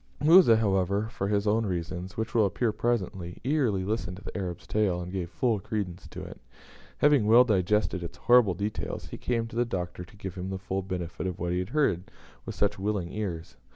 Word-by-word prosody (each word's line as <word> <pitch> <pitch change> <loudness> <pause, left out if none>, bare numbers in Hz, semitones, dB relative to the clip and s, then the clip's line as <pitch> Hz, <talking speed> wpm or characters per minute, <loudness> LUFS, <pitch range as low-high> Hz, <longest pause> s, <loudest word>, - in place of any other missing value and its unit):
Musa, 155 -6 +7
however, 100 0 +1
for 100 -3 -3
his 100 0 +1
own 110 +2 +2
reasons 90 -1 -4
which 110 0 -3
will 110 -3 +4
appear 115 +4 0
presently 95 -7 -2
eagerly 125 -9 +1
listened 105 -4 -2
to 100 - -12
the - - -8
Arab's 90 -3 -4
tale, 100 -5 +1
and 90 0 -6
gave 90 -3 -3
full 110 +5 0
credence 100 -4 -4
to - - -8
it. - - -10 0.6
Having 145 -7 +4
well 115 +3 +8
digested 105 -3 +1
its 85 - -7
horrible 120 -6 +5
details, 105 +4 -4
he - - -7
came 115 -2 -1
to 115 - -10
the 120 - +3
Doctor 90 -6 -4
to 90 +4 -16
give 95 -3 -6
him 95 +1 -5
the 95 - -3
full 95 0 -3
benefit 90 -1 -4
of 90 - -4
what 85 0 -2
he 90 - 0
had 90 +1 -3
heard 115 - +1 0.4
with - - -5
such 105 -1 0
willing 100 -3 -2
ears. 85 -10 -5
100 Hz, 210 wpm, -28 LUFS, 90-110 Hz, 0.6 s, well